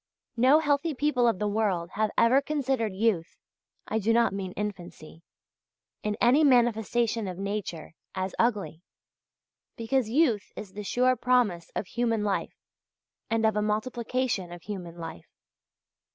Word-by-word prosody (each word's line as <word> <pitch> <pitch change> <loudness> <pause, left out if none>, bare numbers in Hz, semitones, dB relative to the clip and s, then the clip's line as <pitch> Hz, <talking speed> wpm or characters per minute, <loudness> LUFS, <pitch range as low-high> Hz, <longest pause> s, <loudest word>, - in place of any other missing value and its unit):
No 255 +5 +5
healthy 300 0 +1
people 255 -3 +2
of 230 - +2
the 210 - -1
world 200 -5 0
have 215 +1 0
ever 255 +4 +5
considered 270 -7 -1
youth 190 -4 0 0.5
(I 220 - 0
do 225 +2 +1
not 235 -3 +3
mean 195 -2 -4
infancy) 175 -6 -7 0.8
in 210 0 -2
any 260 +6 +5
manifestation 235 -3 +2
of 180 -1 -5
nature, 195 -5 -4 0.2
as 185 0 -3
ugly; 210 -8 0 1.0
because 230 0 0
youth 240 -6 +2
is 195 -3 -8
the 210 - -6
sure 250 +5 +2
promise 235 -8 +1
of - - -2
human 230 +1 -1
life 200 -2 -2 0.7
and 225 -1 +1
of 220 -1 +2
a 210 - +1
multiplication 220 -2 -1
of 175 -1 -10
human 180 -5 -7
life. 165 - -8
220 Hz, 140 wpm, -27 LUFS, 195-245 Hz, 1.0 s, No